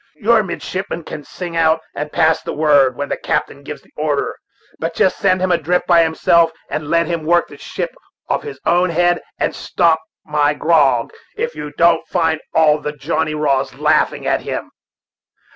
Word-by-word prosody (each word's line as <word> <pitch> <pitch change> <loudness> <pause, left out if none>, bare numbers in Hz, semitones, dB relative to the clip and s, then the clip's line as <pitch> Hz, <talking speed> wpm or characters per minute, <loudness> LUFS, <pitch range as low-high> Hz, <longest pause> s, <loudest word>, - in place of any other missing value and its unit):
Your 220 +7 +3
midshipman 185 -2 -5
can 150 - -7
sing 175 +3 -7
out, 160 -1 +3
and 150 +1 -5
pass 160 0 +2
the - - -5
word, 145 -4 +4
when 145 - -3
the - - -2
captain 140 - -2
gives 145 +1 -8
the - - -27
order, 150 -2 -1 0.4
but 165 +1 -3
just 190 - +2
send 185 -2 +2
him 185 0 +1
adrift 175 +1 +1
by 170 -2 +5
himself, 165 +1 +3 0.2
and 155 -1 -3
let 170 +2 +2
him 170 -2 -3
work 175 +2 +2
the - - -12
ship - - -5 0.3
of - - 0
his 440 -2 -8
own 180 +1 +3
head, 175 +1 +2 0.2
and - - -1
stop 165 -3 +2 0.3
my 150 -1 +1
grog 145 -8 +2 0.2
if 475 +2 -2
you 150 - -7
don't 170 -1 +3
find 160 -3 0
all 155 -1 +4
the 150 - -4
Johnny 155 +2 -2
Raws 135 -3 0
laughing 150 +2 +1
at - - +1
him." - - -5
160 Hz, 180 wpm, -18 LUFS, 150-175 Hz, 0.4 s, by